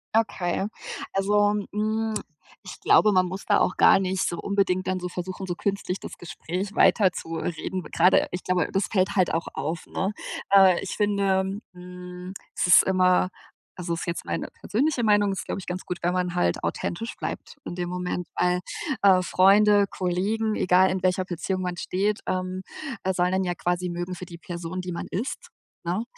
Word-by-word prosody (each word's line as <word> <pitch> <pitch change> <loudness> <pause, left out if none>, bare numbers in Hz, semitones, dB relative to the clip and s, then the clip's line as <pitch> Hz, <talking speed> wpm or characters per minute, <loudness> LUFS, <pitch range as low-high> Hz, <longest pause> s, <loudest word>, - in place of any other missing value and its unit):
Okay. 195 -4 +1 0.5
Also, 205 +1 +3 0.2
mm, 220 +1 -1 0.5
ich - - -9
glaube, 210 - +5
man 185 -1 +4
muss 190 +2 -6
da - - +3
auch - - +1
gar - - +6
nicht 190 -1 0
so 170 - -3
unbedingt 195 -2 0
dann 185 0 0
so 180 - -4
versuchen, 185 +2 -5
so 175 -2 -3
künstlich 195 -1 -2
das - - -9
Gespräch 180 +3 -5
weiter 195 -5 +5
zu 165 -2 -6
reden. 175 +2 -3
Gerade 180 +3 +3
ich 180 - -5
glaube, 180 -2 +1
das 195 - 0
fällt 200 0 +1
halt 185 -2 +3
auch 165 - -1
auf, 160 +5 -3
ne? 190 +2 -2 0.4
Äh, 190 -3 +7
ich - - -5
finde, 200 -1 +1
mm, 180 +1 -9 0.2
es - - +1
ist 175 - +8
immer, 185 -1 +3 0.5
also 175 -2 -3
ist 165 - -4
jetzt 170 - -3
meine - - -3
persönliche 260 +3 0
Meinung, 205 -2 +4
es 195 - -3
ist - - -5
glaube - - -3
ich, - - -10
ganz 180 +1 -4
gut, 180 - -4
wenn 175 +1 +1
man 180 -1 -1
halt 175 - +1
authentisch 225 +7 -3
bleibt - - -6
in - - -5
dem 175 -1 -3
Moment, 180 -1 -3
weil, 180 0 +2 0.4
äh, 190 -2 +6
Freunde, 200 +3 +5
Kollegen, 200 +5 -1
egal 185 +1 +4
in 185 0 -2
welcher 185 0 +2
Beziehung 185 +1 -3
man 180 -1 -3
steht, 205 +4 -1
ähm, 185 0 -2 0.4
äh, 190 - +1
sollen 180 0 +1
einen 190 0 +1
ja 175 - 0
quasi 180 0 -1
mögen 175 +1 -4
für 185 - -8
die 170 -1 -10
Person, 175 +1 -5
die 180 0 -5
man 170 - -4
ist, 225 +8 -4 0.4
ne? 180 +6 -1
185 Hz, 190 wpm, -25 LUFS, 180-195 Hz, 0.5 s, ist